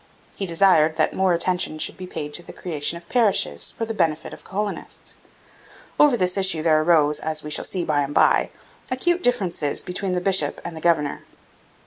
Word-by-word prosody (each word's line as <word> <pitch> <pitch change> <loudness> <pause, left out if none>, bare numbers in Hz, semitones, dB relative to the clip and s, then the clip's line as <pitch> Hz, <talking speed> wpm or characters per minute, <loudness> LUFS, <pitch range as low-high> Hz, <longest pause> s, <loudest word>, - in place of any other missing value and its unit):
He 195 - -4
desired 165 -3 +3
that - - +1
more 190 -1 +1
attention 175 -2 +1
should - - -2
be 185 - -9
paid 150 -4 -6
to 175 - -2
the - - -12
creation 165 -1 -3
of 170 0 -15
parishes 230 -5 +1
for 225 - -4
the 225 - -4
benefit 165 -6 -1
of - - -11
the - - -19
colonists. 205 +2 -5 0.9
Over 290 -5 +5
this 180 -1 0
issue 190 -5 +1
there 155 -1 +3
arose, 155 -2 +3
as 155 -1 -3
we 150 - -7
shall - - +1
see 180 -3 -2
by 145 -2 +1
and 140 +1 -3
by, - - +4 0.4
acute 345 +8 0
differences 185 - 0
between 185 +1 -3
the 180 - 0
bishop 180 -5 +1
and 170 -1 -6
the 160 - -8
governor. 155 -4 0
175 Hz, 195 wpm, -22 LUFS, 155-195 Hz, 0.9 s, Over